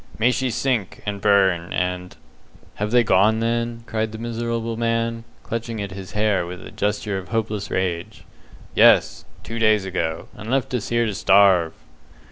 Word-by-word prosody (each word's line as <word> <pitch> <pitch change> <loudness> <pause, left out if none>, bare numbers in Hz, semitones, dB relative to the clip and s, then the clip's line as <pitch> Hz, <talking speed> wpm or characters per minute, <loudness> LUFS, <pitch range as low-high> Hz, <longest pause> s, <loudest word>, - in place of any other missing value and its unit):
"May 120 +3 +3
she 130 +1 -1
sink, 120 -5 -2
and 100 -1 -4
burn, 95 -4 +3
and 90 0 -2 0.3
" - - -27
"Have 105 - 0
they 120 +1 +4
gone, 105 +2 +3
then?" 115 0 -1
cried 110 -1 -2
the 110 - -7
miserable 115 0 -3
man, 115 0 -1 0.2
clutching 115 -1 -4
at 100 -1 -4
his 95 0 -9
hair 105 -3 +1
with 90 +1 -8
a - - -10
gesture 105 -1 -2
of 95 - -10
hopeless 110 -3 -2
rage. 90 -2 -3 0.5
"Yes; - - +4 0.2
two 115 +1 -5
days 110 -3 +3
ago, 80 -4 -3
and 105 +2 -8
left 130 0 0
us 120 -5 -2
here 120 0 +2
to 105 - -2
starve." 95 -4 +4
110 Hz, 170 wpm, -22 LUFS, 95-115 Hz, 0.5 s, they